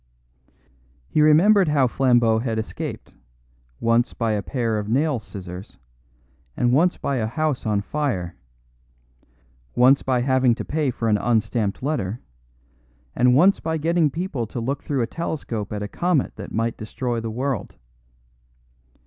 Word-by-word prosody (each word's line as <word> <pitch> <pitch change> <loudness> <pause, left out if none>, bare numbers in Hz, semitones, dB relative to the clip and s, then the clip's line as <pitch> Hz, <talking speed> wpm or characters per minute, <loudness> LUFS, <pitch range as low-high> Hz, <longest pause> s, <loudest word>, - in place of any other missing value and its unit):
He 155 - +2
remembered 180 +6 +5
how 145 -3 +3
Flambeau 120 -3 +3
had 115 -2 -2
escaped, 110 - -5 0.7
once 115 +1 +1
by 115 -2 0
a 105 -1 0
pair 115 -1 -1
of 105 0 -5
nail 140 +2 +1
scissors, 95 -3 -9 0.8
and 120 0 +2
once 175 +6 +3
by 140 - -2
a 110 -2 -1
house 150 0 -2
on 105 -2 +1
fire; 100 - -2 1.4
once 130 +3 +5
by 130 -2 0
having 130 -2 +3
to - - -6
pay 150 -2 0
for 115 -2 -2
an 105 -2 +2
unstamped 110 -2 0
letter, 120 -7 -2 1.0
and 125 0 +4
once 185 +8 +5
by 160 0 -2
getting 165 0 +2
people 145 -7 -3
to 120 - -5
look 135 +5 -2
through 135 -4 -1
a - - +1
telescope 120 - -4
at 105 -1 -3
a - - -3
comet 170 - 0
that - - -8
might 115 +1 -1
destroy 120 +2 -3
the 115 0 -4
world. 125 0 -3
125 Hz, 150 wpm, -23 LUFS, 110-150 Hz, 1.4 s, remembered